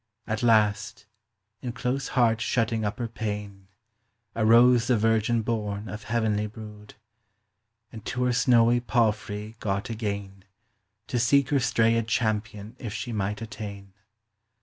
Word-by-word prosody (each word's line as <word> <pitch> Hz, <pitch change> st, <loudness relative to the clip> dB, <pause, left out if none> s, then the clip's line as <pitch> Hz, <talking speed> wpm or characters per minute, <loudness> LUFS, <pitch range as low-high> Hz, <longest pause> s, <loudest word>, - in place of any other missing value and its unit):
At 110 Hz, +2 st, -3 dB
last, 110 Hz, -3 st, +2 dB, 0.6 s
in 125 Hz, -3 st, -4 dB
close 125 Hz, +2 st, -2 dB
hart 115 Hz, -2 st, +3 dB
shutting 115 Hz, -2 st, 0 dB
up 105 Hz, -1 st, -2 dB
her 120 Hz, -, -3 dB
payne, 105 Hz, -4 st, -6 dB, 0.7 s
Arose 120 Hz, +2 st, +5 dB
tin; 125 Hz, -3 st, +3 dB
virgin 115 Hz, +1 st, +2 dB
borne 105 Hz, -2 st, -3 dB
of 105 Hz, +3 st, -7 dB
heavenly 110 Hz, -2 st, 0 dB
brood, 105 Hz, -1 st, -11 dB, 1.0 s
And 110 Hz, -2 st, -10 dB
to 125 Hz, -, -2 dB
her 125 Hz, -1 st, +2 dB
snowy 120 Hz, 0 st, +4 dB
palfrey 110 Hz, -2 st, -1 dB
got 100 Hz, +3 st, -2 dB
agayne, 100 Hz, -3 st, -4 dB, 0.6 s
To 125 Hz, -, -2 dB
seek 135 Hz, +3 st, +3 dB
her 140 Hz, -, +2 dB
strayed 115 Hz, -2 st, +2 dB
champion 110 Hz, -1 st, -2 dB
if 110 Hz, -4 st, -6 dB
she 120 Hz, -, -4 dB
might 105 Hz, +1 st, -2 dB
attayne. 100 Hz, -3 st, -8 dB
110 Hz, 130 wpm, -26 LUFS, 105-120 Hz, 1.0 s, Arose